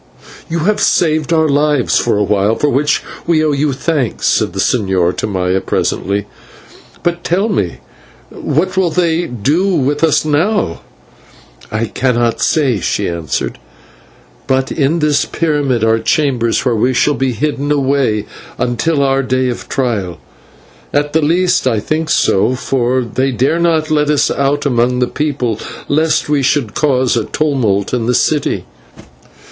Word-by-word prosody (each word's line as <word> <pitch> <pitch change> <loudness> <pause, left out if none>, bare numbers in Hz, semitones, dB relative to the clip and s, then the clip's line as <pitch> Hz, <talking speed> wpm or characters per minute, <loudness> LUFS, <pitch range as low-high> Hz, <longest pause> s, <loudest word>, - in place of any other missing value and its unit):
"You 165 0 -1
have 210 +6 +1
saved 155 -2 +1
our 160 -1 +3
lives 145 -2 +2
for - - +1
a 105 - +2
while, 105 +2 +1
for 145 - 0
which 145 +4 +1 0.2
we 155 -2 +2
owe 155 - +2
you 145 +1 0
thanks," 135 -2 -2
said - - +1
the - - -5
señor 95 -6 +1
to - - -2
Maya 95 -1 0
presently, 100 +1 -1 0.8
"but 175 0 -1
tell 195 +6 0
me, 95 - -2 0.5
what 185 +6 -1
will 190 -2 +2
they 170 0 0
do 140 - 0
with 145 +1 0
us 160 -1 +3
now?" 155 - 0 0.9
"I 110 +2 -1
cannot 120 0 0
say," 135 -9 +1
she - - -1
answered, 85 -2 -3 0.9
"but 130 0 0
in 150 +2 +1
this 150 -3 +1
pyramid 145 -7 0
are 110 0 +3
chambers 125 -5 0
where 125 -2 +2
we 125 +4 +1
shall 145 +4 +2
be 135 -2 -1
hidden 145 +4 -2
away 135 -7 +1 0.3
until 140 +5 0
our 135 0 +2
day 130 0 0
of 120 0 -6
trial. 110 -10 -2 0.7
At 145 0 0
the 160 - +3
least 175 0 +2
I 115 -4 +1
think 155 +8 -2
so, 110 +1 +2
for 130 0 0
they 130 +3 -1
dare 135 +7 +1
not 160 -2 +1
let 150 -1 +2
us 150 -1 +2
out 140 +1 0
among 125 -2 +1
the 125 - +2
people, 125 -5 -2 0.3
lest 155 +2 +1
we 145 -1 +1
should 130 -5 0
cause 130 -5 +1
a 115 - 0
tumult 125 -11 0
in 120 -2 -1
the 125 - +2
city." 150 -2 0
135 Hz, 155 wpm, -15 LUFS, 120-155 Hz, 0.9 s, our